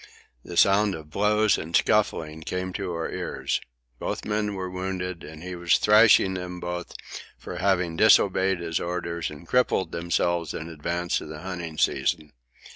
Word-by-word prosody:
The 85 - -7
sound 100 +1 +4
of 75 -1 -11
blows 105 +3 +2
and 85 +2 -4
scuffling 80 0 +1
came 90 +3 -4
to 95 -2 -3
our 85 -1 -3
ears. - - -2 0.4
Both - - -4
men 105 -1 -1
were 95 -1 -4
wounded, 90 -1 -4
and 80 +1 -10
he 90 0 -6
was 85 -1 +2
thrashing 105 -2 +5
them 90 -1 -5
both 90 0 -5 0.4
for - - -8
having 90 -3 +1
disobeyed 95 -3 +4
his 80 -1 -1
orders 85 -1 -3
and 75 +2 -11
crippled 125 -5 +1
themselves 85 -1 -1
in 80 +1 -6
advance 85 +2 -2
of - - -9
the 75 0 -8
hunting 85 -4 -6
season. 75 +3 0
90 Hz, 160 wpm, -25 LUFS, 85-95 Hz, 0.4 s, thrashing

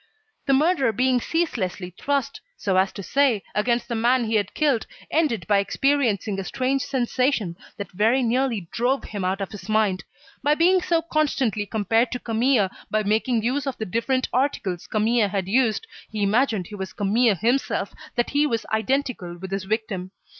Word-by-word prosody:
The 275 - +4
murderer 280 -3 +3
being 250 +2 +2
ceaselessly 190 - -2
thrust, 280 - -2 0.2
so 190 -2 +2
to 200 0 -9
say, 265 -3 +2
against 235 +3 0
the 235 - -3
man 240 +2 +2
he 220 - -2
had 205 -3 0
killed, 285 -7 +1 0.2
ended 300 -8 +1
by 205 -2 +3
experiencing 220 -3 +1
a - - -3
strange 260 +6 -1
sensation 250 -7 0 0.2
that 200 - -6
very 225 +7 +2
nearly 235 -5 0
drove 255 +4 0
him 205 -3 -5
out 190 +2 -1
of 195 - -4
his 205 0 -9
mind. 215 -3 +1 0.4
By 295 +2 +3
being 360 +3 +4
so 335 -2 +1
constantly 270 - 0
compared 225 +3 +1
to 245 - -3
Camille, 230 -3 +2 0.2
by 215 0 +1
making 220 +2 +1
use 270 +4 0
of 270 - -3
the 220 - -3
different 255 +6 0
articles 230 -9 -1
Camille 220 0 +2
had 190 -2 -2
used, 235 - +2 0.2
he 215 -2 -2
imagined 215 -2 +2
he 210 - -9
was 190 -1 -6
Camille 215 +2 +2
himself, 240 +8 0 0.2
that 240 - 0
he 290 +1 +3
was 230 -5 -2
identical 220 -6 -1
with 190 +2 -8
his 195 -1 -2
victim. 205 -3 -2
230 Hz, 175 wpm, -24 LUFS, 205-265 Hz, 0.4 s, The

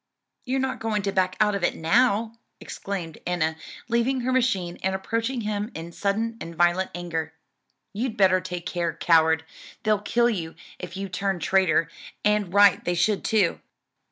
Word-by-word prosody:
"You're 265 +1 0
not 265 0 -2
going 215 -2 -1
to 195 - 0
back 185 -1 +1
out 210 -1 +3
of 200 -2 -3
it - - +1
now?" 220 +5 +2 0.3
exclaimed 175 -5 -6
Enna, 160 -3 0 0.3
leaving 240 +2 +1
her 255 +2 -1
machine, 195 -9 0
and 190 0 0
approaching 230 +5 -2
him 210 0 -2
in 165 +1 -7
sudden 220 +5 -1
and 170 0 -7
violent 175 +2 +2
anger. 165 -2 -4 0.6
"You'd 230 +2 -3
better 185 -2 +4
take 180 -1 -6
care, 170 -2 -2
coward, 160 -1 +3 0.4
they'll 215 -2 +2
kill 235 +3 +2
you 165 -6 -4 0.2
if 180 0 -7
you 195 0 -3
turn 195 0 -2
traitor; 175 -3 +2 0.4
and 210 -3 +2
right 205 0 +5
they 175 - -1
should 200 +4 +1
too." 205 -6 +2
195 Hz, 165 wpm, -25 LUFS, 175-220 Hz, 0.6 s, right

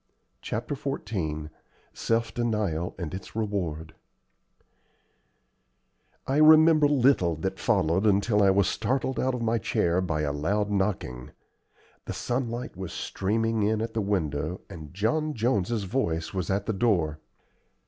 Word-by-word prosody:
CHAPTER 115 +6 -3
XIV 95 - -4 0.4
SELF 115 0 -1
DENIAL 105 -8 -1
AND 85 -3 -5
ITS 95 +3 -8
REWARD 90 -8 -3 2.3
I 135 - 0
remember 155 0 +7
little 130 - +3
that 95 +5 -4
followed 85 +7 +2
until 105 +1 +3
I 100 - +5
was 95 -2 +3
startled 130 +3 -1
out 130 0 +1
of 120 - -3
my 115 +1 +1
chair 90 -3 +1
by 80 -4 -1
a 75 -1 -1
loud 100 +8 -1
knocking. 95 -11 -2 0.8
The - - -4
sunlight 120 -2 -3
was 95 -1 -6
streaming 115 +3 -1
in 105 +1 +1
at 115 0 -3
the 110 - 0
window 85 -4 -2
and 75 -3 -9
John 150 - 0
Jones's 110 -2 0
voice 90 -7 -2
was 95 -2 -3
at 100 +1 0
the 110 - -1
door. 90 -8 +1
100 Hz, 135 wpm, -27 LUFS, 85-115 Hz, 2.3 s, remember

